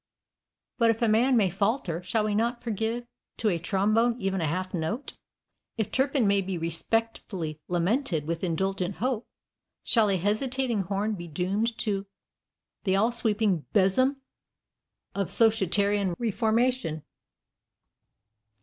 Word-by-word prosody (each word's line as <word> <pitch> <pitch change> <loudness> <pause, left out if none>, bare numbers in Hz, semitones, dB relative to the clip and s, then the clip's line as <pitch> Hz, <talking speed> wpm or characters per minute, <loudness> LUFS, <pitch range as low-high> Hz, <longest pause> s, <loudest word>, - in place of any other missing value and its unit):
But 230 -1 +5
if 225 +1 +1
a - - +4
man 240 +4 +4
may 195 -5 +3
falter, 195 -3 -1
shall 210 +5 0
we 210 -1 0
not 235 +3 0
forgive 230 +1 -2 0.3
to 220 - +1
a 170 -4 0
trombone 215 +7 +1
even 195 -3 -1
a 160 - 0
half 185 +4 -3
note? 190 - -3 0.6
If 220 -3 -2
Turpin 270 -2 +2
may 200 0 +3
be 190 -1 -3
respectfully 170 -1 -2
lamented 175 - 0
with 165 +2 -3
indulgent 190 +2 -1
hope, 240 +3 -2 0.6
shall 220 -3 +3
a 195 - +2
hesitating 235 +4 0
horn 200 +4 -1
be 175 -4 -6
doomed 200 +8 -1
to 200 -2 -1 0.8
"the 190 -2 +2
all 220 +5 +3
sweeping 215 -7 +1
besom 255 +8 +3 0.9
of 195 -2 -1
societarian 205 -3 +2
reformation?" 225 - 0
205 Hz, 130 wpm, -27 LUFS, 185-230 Hz, 0.9 s, But